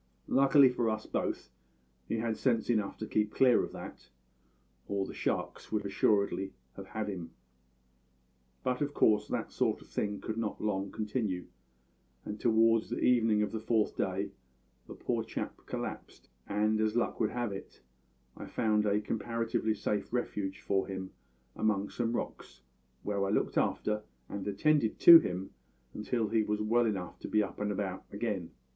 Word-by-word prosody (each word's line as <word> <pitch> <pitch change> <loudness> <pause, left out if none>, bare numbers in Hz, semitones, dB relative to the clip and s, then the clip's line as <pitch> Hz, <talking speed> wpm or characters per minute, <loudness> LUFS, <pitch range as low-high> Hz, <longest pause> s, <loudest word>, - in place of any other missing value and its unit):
Luckily 135 +1 +6
for 120 -2 0
us 110 0 -2
both - - -3 0.6
he 115 - -1
had 115 0 -1
sense 120 -2 +1
enough 105 -4 0
to 110 - -4
keep 105 0 0
clear 130 -2 +5
of - - -5
that, - - -9 0.8
or 100 -1 -1
the - - -8
sharks - - -3
would 105 -2 -1
assuredly 100 -1 +1 0.2
have 95 0 -9
had 110 +1 -3
him. 90 -5 -5 1.3
But 125 0 -1
of 145 0 -1
course 105 -1 +4
that - - -3
sort - - +1
of - - -16
thing 105 -1 -2
could 110 0 -4
not 115 -2 -2
long 100 -2 -1
continue, 105 -4 -2 0.8
and 105 0 -5
toward 115 0 +4
the - - -4
evening 115 -4 +3
of 105 - -2
the 110 - -3
fourth 110 -1 +1
day - - -1 0.6
the - - -9
poor - - -1
chap - - -6
collapsed, - - -6 0.2
and, 105 +1 +1
as 110 0 +1
luck 120 - 0
would 110 - +2
have 120 -3 -2
it, 95 -8 -9 0.5
I - - -8
found 105 -1 +1
a 105 +1 +2
comparatively 115 0 -1
safe 105 -1 -2
refuge 105 -5 -2
for 95 -1 0
him 95 -1 -5 0.4
among 105 -2 0
some 115 -1 -1
rocks, - - -6 0.4
where 100 -1 -1
I 100 - 0
looked 105 - 0
after 105 0 +1 0.3
and 100 0 -5
attended 110 +4 +2
to 170 -1 +12
him 95 - -4 0.4
until 110 0 -1
he 110 +1 +3
was 105 0 -1
well 115 +2 +2
enough 95 -5 -3
to - - -6
be 105 0 +3
up 95 - -7
and 105 0 -1
about 95 -2 -3
again. 100 -5 -3
105 Hz, 165 wpm, -31 LUFS, 100-115 Hz, 1.3 s, to